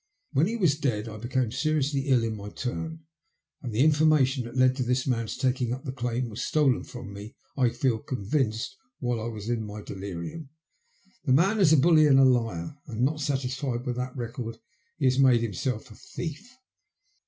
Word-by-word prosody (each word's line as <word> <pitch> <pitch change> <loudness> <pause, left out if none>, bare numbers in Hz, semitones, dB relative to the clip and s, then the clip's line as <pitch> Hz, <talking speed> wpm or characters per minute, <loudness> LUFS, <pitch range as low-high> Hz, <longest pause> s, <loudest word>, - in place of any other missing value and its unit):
When 145 +5 +3
he 225 - -2
was 160 -8 +2
dead 115 -7 -1
I 110 -1 -7
became 120 +1 -1
seriously 145 -1 0
ill 130 -4 +4
in 110 -1 -2
my 105 -1 -7
turn, 160 +8 -4 0.6
and 125 - -5
the 110 +5 +3
information 145 -4 +3
that 120 +2 -7
led 130 0 +4
to 130 - 0
this 125 +1 0
man's 115 -4 -1
taking 125 -2 0
up 130 +5 -7
the 130 - -3
claim 125 -1 -2
was 110 -1 -6
stolen 145 -5 +2
from 120 -5 -9
me, 105 +3 -9 0.2
I 125 -3 +3
feel 120 -1 0
convinced, 125 - -2 0.2
while 120 -3 -1
I 115 - -3
was 110 -2 -6
in 120 -2 -1
my 105 0 -7
delirium. 100 - -6 0.8
The 130 - +3
man 195 +10 +3
is 180 -6 +5
a 160 - +7
bully 155 +1 +6
and 135 -2 +6
a 135 - +7
liar, 115 - 0
and 115 -3 -4
not 150 +3 +1
satisfied 130 -2 -2
with 125 -1 -2
that 125 +1 -4
record, 115 -1 -5 0.4
he 145 - -1
has 130 +1 +3
made 130 -4 +5
himself 115 +2 -3
a - - -12
thief." 175 +9 -7
125 Hz, 195 wpm, -27 LUFS, 115-140 Hz, 0.8 s, a